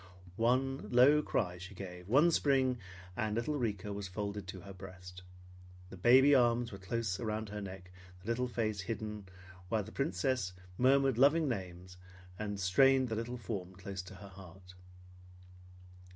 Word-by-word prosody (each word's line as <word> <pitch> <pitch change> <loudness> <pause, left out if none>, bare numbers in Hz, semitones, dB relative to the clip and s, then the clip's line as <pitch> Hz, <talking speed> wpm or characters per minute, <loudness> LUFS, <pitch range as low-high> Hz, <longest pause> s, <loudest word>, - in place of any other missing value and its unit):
One 130 +4 +1
low 135 +5 +6
cry 90 -11 -1
she 90 +3 -9
gave; 90 -1 -8
one 145 +8 +5
spring, 130 -5 +2 0.4
and 110 -3 -1
little 120 +6 -1
Rika 105 -4 -2
was 100 -1 -5
folded 100 0 -5
to 95 0 -7
her 100 +2 -10
breast. 90 -1 -11 0.7
The - - -8
baby 130 +9 +6
arms 120 -2 +3
were 100 - -8
close 100 -1 -2
around 110 -2 -3
her 105 0 -5
neck, 95 -2 -9 0.3
the - - -13
little 125 +2 0
face 110 -4 -2
hidden 105 -1 -5 0.4
while 110 -2 +1
the 110 - -10
Princess 110 -4 -1 0.2
murmured 135 0 +3
loving 150 +4 +5
names 90 -5 -5 0.4
and 105 -2 -3
strained 130 +7 +4
the 110 - -2
little 115 +3 -4
form 95 -6 -5
close 95 0 -6
to 90 +2 -12
her 100 +1 -11
heart. 90 -1 -13
105 Hz, 155 wpm, -33 LUFS, 95-125 Hz, 0.7 s, low